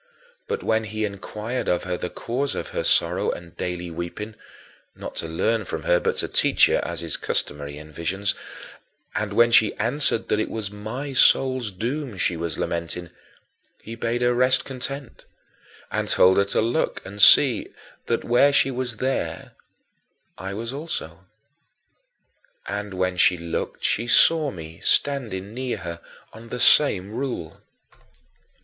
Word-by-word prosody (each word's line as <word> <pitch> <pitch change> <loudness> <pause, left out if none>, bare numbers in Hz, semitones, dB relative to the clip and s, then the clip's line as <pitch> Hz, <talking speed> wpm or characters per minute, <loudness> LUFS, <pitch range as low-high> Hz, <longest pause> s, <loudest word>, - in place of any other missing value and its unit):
But - - -3
when 110 0 +1
he 110 +1 -2
inquired 105 +4 -4
of 90 - +1
her 90 -1 -2
the 90 - -4
cause 130 +9 -3
of - - -5
her - - -3
sorrow - - +3
and 85 0 -6
daily 90 0 -4
weeping 85 +6 -6 0.6
(not - - -8
to 80 - -2
learn 110 +7 0
from 80 -4 -5
her, 90 - +3
but - - -1
to - - -1
teach - - +4
her, - - +1
as - - -4
is - - -2
customary 75 0 -3
in 75 +1 -11
visions), 95 +6 -1 0.8
and 105 -1 -2
when 120 +3 +4
she 110 -2 +5
answered 120 0 +2
that - - +1
it 110 - -1
was 110 -3 -4
my 115 +7 -6
soul's 130 -3 +4
doom 120 +4 -4
she 90 -1 +1
was 85 -2 -4
lamenting, 85 +1 -4 0.7
he 115 - -9
bade 115 +1 -2
her 120 0 +3
rest 125 +1 +3
content 135 0 -6 0.7
and - - -2
told 95 +1 +5
her 100 - +4
to 100 - 0
look 120 +8 -1
and 100 +2 -6
see 125 +2 +7 0.4
that - - 0
where 125 +4 +4
she 135 -1 +3
was 125 -2 -4
there 130 +3 -3 0.8
I 95 +2 -6
was 115 +4 -5
also. 95 - -5 1.4
And 105 -1 -5
when 90 0 -1
she 90 +1 +4
looked 85 0 -5
she 115 +3 +1
saw 155 +4 +5
me 80 -6 -9
standing 110 -8 0
near 130 0 -3
her 85 -1 -7 0.3
on 115 +1 -12
the 125 - -5
same 100 -11 +5
rule. 120 - -5
110 Hz, 155 wpm, -24 LUFS, 90-125 Hz, 1.4 s, see